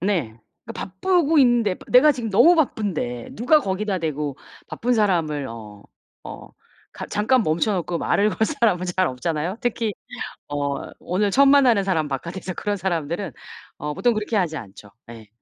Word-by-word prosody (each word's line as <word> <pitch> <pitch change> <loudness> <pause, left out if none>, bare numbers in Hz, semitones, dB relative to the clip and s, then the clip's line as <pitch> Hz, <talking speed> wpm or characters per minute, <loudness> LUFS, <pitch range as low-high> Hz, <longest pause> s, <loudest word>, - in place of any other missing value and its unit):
네. 165 - -1 0.4
바쁘고 320 - +1
있는데 240 -7 +4
쁘 - - -15
내가 275 +5 +7
지금 240 -5 -5
너무 325 - +6
바쁜데 190 - -2
누가 250 +8 +3
거기다 195 -1 -2
대고 150 -4 -3 0.3
바쁜 245 +2 -1
사람을 170 - +1
어 105 -3 -10 0.4
어 - - -10 0.4
가 - - -7
잠깐 225 +4 +2
멈춰 165 +7 +1
놓고 175 -2 -2
말을 205 +5 +2
걸 - - -7
사람은 220 - +1
잘 185 +1 0
없잖아요. 160 - -3
특히 230 -2 -1 0.6
어 145 -1 -3
오늘 200 +3 -1
처음 275 +7 +5
만나는 250 -8 +5
사람 165 -6 0
바깥에서 170 +7 -5
그런 205 -1 -2
사람들은 175 0 -2 0.5
어 150 0 -4
보통 240 +9 +1
그렇게 215 +1 -2
하지 175 -6 0
않죠. 100 -2 -11 0.2
예. 110 -2 -12
190 Hz, 320 characters per minute, -22 LUFS, 150-225 Hz, 0.6 s, 내가